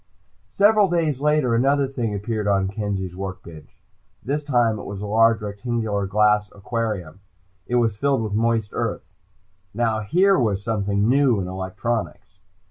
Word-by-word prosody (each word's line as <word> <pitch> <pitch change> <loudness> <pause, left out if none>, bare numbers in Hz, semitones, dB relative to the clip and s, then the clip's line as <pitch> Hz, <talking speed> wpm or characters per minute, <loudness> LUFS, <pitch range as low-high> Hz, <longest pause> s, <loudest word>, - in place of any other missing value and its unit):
Several 205 -1 +4
days 160 -6 0
later 150 -5 +2
another 135 +4 +2
thing 120 -6 -3
appeared 105 +1 -3
on 100 -1 +1
Kenzie's 100 -3 -4
work 95 0 -6
bench. 85 +4 -14 0.4
This 145 +3 -1
time 120 -6 +1
it - - -8
was 100 -1 -6
a 105 - -5
large 115 +1 +3
rectangular 105 -1 -2
glass 105 +1 +2
aquarium. 105 -5 -4 0.5
It 125 - -1
was 115 -4 +1
filled 135 -1 +1
with 105 -2 -4
moist 115 -1 0
earth. - - -3 0.7
Now 110 -1 0
here 180 - +3
was 100 -5 0
something 100 -2 0
new 130 -3 +3
in 90 - -3
electronics! 95 +1 -4
110 Hz, 150 wpm, -22 LUFS, 100-125 Hz, 0.7 s, Several